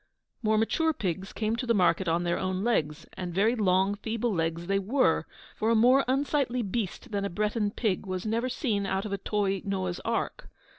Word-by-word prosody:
More 220 -1 +2
mature 320 +9 +2
pigs 190 - -3
came 220 0 -1
to 235 -1 +1
market 180 -1 +3
on 165 +1 +1
their 170 0 0
own 185 +1 -1
legs, 150 -10 0
and 175 -2 -5
very 215 +5 +3
long, 190 -3 +2
feeble 220 +2 -2
legs 165 0 -1
they 195 +2 +1
were, 245 +8 +2 0.3
for 220 - 0
a 230 - +4
more 250 +5 +5
unsightly 265 -2 +1
beast 205 0 -4
than 200 -1 -1
a 200 - -1
Breton 210 +2 0
pig 205 -2 -1
was 185 +1 -3
never 230 +4 0
seen 215 -7 -1
out 190 +2 -1
of 205 - -4
a 200 - -2
toy 195 -1 0
Noah's 185 -3 -2
ark. 230 0 -3
205 Hz, 195 wpm, -28 LUFS, 185-230 Hz, 0.3 s, more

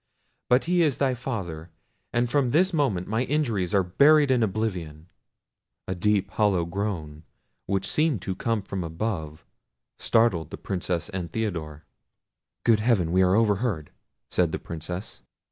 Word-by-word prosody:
But 125 +2 +4
he 175 +1 +2
is 150 -6 +2
thy 135 -2 +2
father, 95 -10 -5 0.4
and 120 +1 +1
from 130 0 +1
this 180 +8 +3
moment 125 - 0
my 110 +3 0
injuries 115 - 0
are 95 - +4
buried 140 - +5
in 125 -2 +3
oblivion." 90 -7 -3 0.8
A 95 - -1
deep 100 +2 +1
and - - -22
hollow 100 -6 +3
groan, 85 -5 -4 0.5
which 95 -1 0
seemed 155 -7 +1
to 95 - -2
come 115 +2 -1
from 95 -2 -4
above, 80 -2 -4 0.5
startled 105 -9 +2
the - - -7
Princess 90 -3 -2
and 90 -5 -5
Theodore. 80 -9 -4 0.8
"Good 115 -2 +4
heaven! 105 -7 +2
we 95 +1 +3
are 95 0 +4
overheard!" 105 -6 +1 0.4
said 85 -3 +2
the - - -2
Princess. 90 +4 -7
100 Hz, 150 wpm, -26 LUFS, 85-120 Hz, 0.8 s, buried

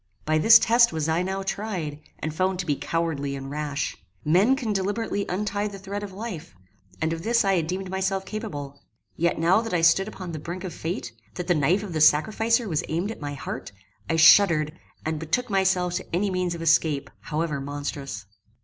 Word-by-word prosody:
By 155 0 +2
this 220 +8 +9
test 235 +1 +4
was 160 -1 -2
I 160 +2 +1
now 190 +1 -2
tried, 190 -7 -3 0.2
and 155 - -4
found 185 +3 0
to 180 - -3
be 150 -4 +1
cowardly 145 -4 -2
and 135 0 -7
rash. 150 -1 -3 0.3
Men 190 - +4
can 235 -6 -2
deliberately 205 +1 -1
untie 205 +2 -1
the 200 -1 -7
thread 200 +1 -5
of 205 -1 -6
life, 190 - -7 0.4
and 160 +1 0
of 165 - -5
this 230 +3 +2
I 195 - +3
had 160 -2 -1
deemed 185 +1 -4
myself 190 0 -1
capable; 145 -11 -6 0.3
yet 170 +1 +1
now 175 +6 +4
that 225 -5 -3
I 170 - +2
stood 170 +4 +4
upon 185 -4 -7
the 155 - -5
brink 175 +5 -6
of 185 -3 -5
fate, 160 -9 -4 0.2
that 180 - -4
the 175 - +3
knife 170 +6 +2
of 195 -5 -6
the 155 - -1
sacrificer 220 +10 +3
was 160 -5 -1
aimed 175 +7 -1
at 225 - -9
my 145 -1 -4
heart, 135 - -6 0.4
I 165 - +2
shuddered 160 -2 +6 0.3
and 160 -1 -1
betook 210 +10 -1
myself 190 -2 +2
to 185 - -5
any 195 +2 +1
means 180 -2 -1
of 165 - -6
escape, 155 -3 +2
however 150 -2 -2
monstrous. 140 -7 -5
175 Hz, 205 wpm, -25 LUFS, 155-195 Hz, 0.4 s, this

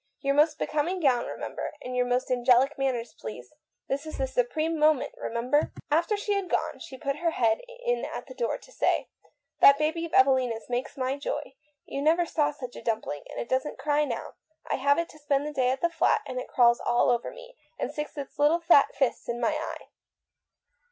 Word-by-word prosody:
Your 275 -1 +1
most 300 +2 +3
becoming 320 +5 -1
gown, 255 -7 +2 0.6
and 250 0 -5
your 250 0 +1
most 250 +1 0
angelic 250 +3 +4
manners, 250 -4 -2
please. 120 +3 -9 0.3
Cest 280 +3 -2
le - - -5
moment 265 -1 -1
supreme, 310 +3 +2
remember." 245 +6 0 0.2
After 340 +7 +2
she 415 0 -1
had 395 -3 -2
gone, - - -1
she 275 -6 -9
put 275 +2 -2
her 335 +2 +1
head 230 -8 +1 0.2
in 485 0 +1
at - - -5
the - - -11
door 485 -1 -1
to - - -18
say: - - 0 0.5
"That 280 0 +8
baby 315 +2 0
of 325 - -19
Evelina's 260 -4 +3
makes 250 +4 -3
my 260 +1 -1
joy. 280 - -4 0.3
You 275 - -4
never 330 +4 +3
saw 305 -3 +1
such 255 -4 -8
a - - -8
dumpling, 220 -10 -3
and - - -6
it 235 - -6
never 260 +3 0
cries 295 0 +1
now. 235 -3 -5 0.3
I - - -1
have 280 +2 +3
it 335 0 0
to 310 - -15
spend 290 -1 0
the 300 - -4
day 255 -3 +2
at 265 +1 -1
the 340 - +2
flat, 335 - +2
and 255 -1 -4
it - - -6
crawls 240 -1 +4
all 240 +1 +2
over 235 -1 0
me, - - -13 0.2
and - - -3
sticks 300 +1 -6
its 280 -2 -6
fat - - -5
little 305 +4 +4 0.4
fists 265 -3 -1
in 235 0 -2
my 235 - +2
eye." - - -5
275 Hz, 205 wpm, -27 LUFS, 250-310 Hz, 0.6 s, That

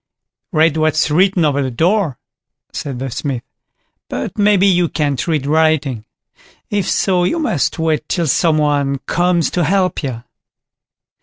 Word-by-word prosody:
"Read 160 -2 +2
what's 155 -1 +1
written 185 +1 +3
over 145 -1 +1
the 130 - -1
door", 165 - 0 0.6
said 145 -6 -5
the 130 +1 -5
Smith; 130 -1 -3 0.7
"but 85 - -4
maybe 205 -2 +3
you 175 -4 +3
can't 145 -3 -1
read 155 -5 0
writing. 150 -6 +1 0.7
If 205 -3 -1
so, 185 -2 +1
you 180 - 0
must 305 - -1
wait 160 -2 -1
till 170 -2 0
some 155 +2 +2
one 145 -2 +1
comes 175 -3 +1
to 175 - 0
help 185 +3 +1
you." 125 -6 -5
160 Hz, 145 wpm, -17 LUFS, 140-180 Hz, 0.7 s, written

